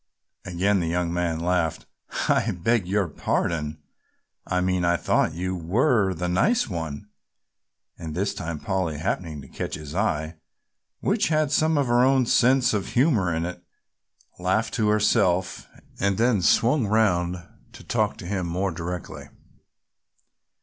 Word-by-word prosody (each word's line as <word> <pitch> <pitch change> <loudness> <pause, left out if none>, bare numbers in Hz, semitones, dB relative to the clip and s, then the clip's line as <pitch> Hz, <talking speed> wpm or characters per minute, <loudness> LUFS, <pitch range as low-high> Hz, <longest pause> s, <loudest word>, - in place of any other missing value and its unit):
Again 95 +3 +1
the 85 - -1
young 85 0 -1
man 85 -2 -1
laughed. 85 -2 -1 0.4
"I - - +2
beg 115 0 +1
your 100 0 +1
pardon, 75 0 -2 0.7
I 90 - 0
mean 90 0 0
I 85 0 +2
thought 80 - +1
you 90 +2 -2
were 95 - +1
the 90 +2 -3
nice 115 - +2
one!" 80 -1 -5 0.9
And 80 -3 -6
this 100 +2 -1
time 85 -5 -5
Polly 95 -5 -2
happening 80 -2 -3
to - - -12
catch - - -5
his 75 0 -8
eye, 80 -5 -1 0.6
which 205 +2 +1
had 155 -2 +1
some 155 +1 +2
of 140 - +2
her 120 0 +3
own 130 -1 +4
sense 125 +2 +3
of 100 -2 -1
humor 120 - +2
in 80 +1 -1
it, 90 0 -7 0.8
laughed 95 +5 0
to 110 -3 +1
herself 100 -4 +1 0.3
and 100 -1 +1
then 115 -3 +2
swung 120 - +3
round 90 -5 +1 0.3
to - - -12
talk - - 0
to - - -9
him 95 -1 -2
more 90 +3 -1
directly. 90 +1 -6
90 Hz, 150 wpm, -24 LUFS, 85-110 Hz, 0.9 s, own